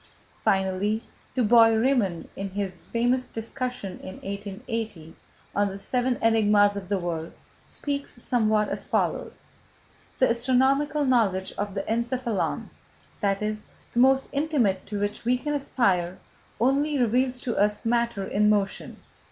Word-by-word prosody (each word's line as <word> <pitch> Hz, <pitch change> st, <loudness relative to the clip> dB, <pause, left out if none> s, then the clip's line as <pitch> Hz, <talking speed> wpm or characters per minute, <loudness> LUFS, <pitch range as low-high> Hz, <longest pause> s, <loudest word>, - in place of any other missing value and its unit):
Finally, 195 Hz, +3 st, +1 dB, 0.3 s
Du 255 Hz, -, +2 dB
Bois 230 Hz, +1 st, +7 dB
Reymond, 225 Hz, -7 st, +1 dB
in 195 Hz, 0 st, -4 dB
his 190 Hz, -2 st, -4 dB
famous 245 Hz, +2 st, +1 dB
discussion 230 Hz, -4 st, -5 dB
in 185 Hz, -, -8 dB
1880, 200 Hz, -3 st, -5 dB, 0.4 s
on 205 Hz, 0 st, +3 dB
the 195 Hz, 0 st, -5 dB
seven 245 Hz, +4 st, 0 dB
enigmas 210 Hz, -2 st, +4 dB
of 195 Hz, -2 st, -6 dB
the 200 Hz, -, +1 dB
world, 170 Hz, -3 st, -3 dB, 0.4 s
speaks 280 Hz, -3 st, -4 dB
somewhat 215 Hz, -3 st, +2 dB
as -, -, -4 dB
follows: -, -, -1 dB, 0.7 s
"The 260 Hz, -, +4 dB
astronomical 265 Hz, +5 st, +2 dB
knowledge 210 Hz, -8 st, +2 dB
of 205 Hz, -1 st, -4 dB
the 195 Hz, -, -1 dB
encephalon, 235 Hz, -1 st, -1 dB, 0.5 s
that 200 Hz, -1 st, 0 dB
is, 215 Hz, 0 st, -3 dB, 0.3 s
the 240 Hz, -, +1 dB
most 265 Hz, +1 st, +4 dB
intimate 280 Hz, -11 st, +1 dB
to 205 Hz, -1 st, -3 dB
which 205 Hz, 0 st, -2 dB
we 245 Hz, +2 st, +2 dB
can 295 Hz, +4 st, -3 dB
aspire, 195 Hz, -11 st, +1 dB, 0.4 s
only 280 Hz, +5 st, +2 dB
reveals 250 Hz, +1 st, +1 dB
to 240 Hz, -, -2 dB
us 210 Hz, +2 st, +1 dB
matter 235 Hz, -3 st, +1 dB
in 210 Hz, +2 st, +2 dB
motion. 205 Hz, -2 st, 0 dB
220 Hz, 135 wpm, -26 LUFS, 200-250 Hz, 0.7 s, Bois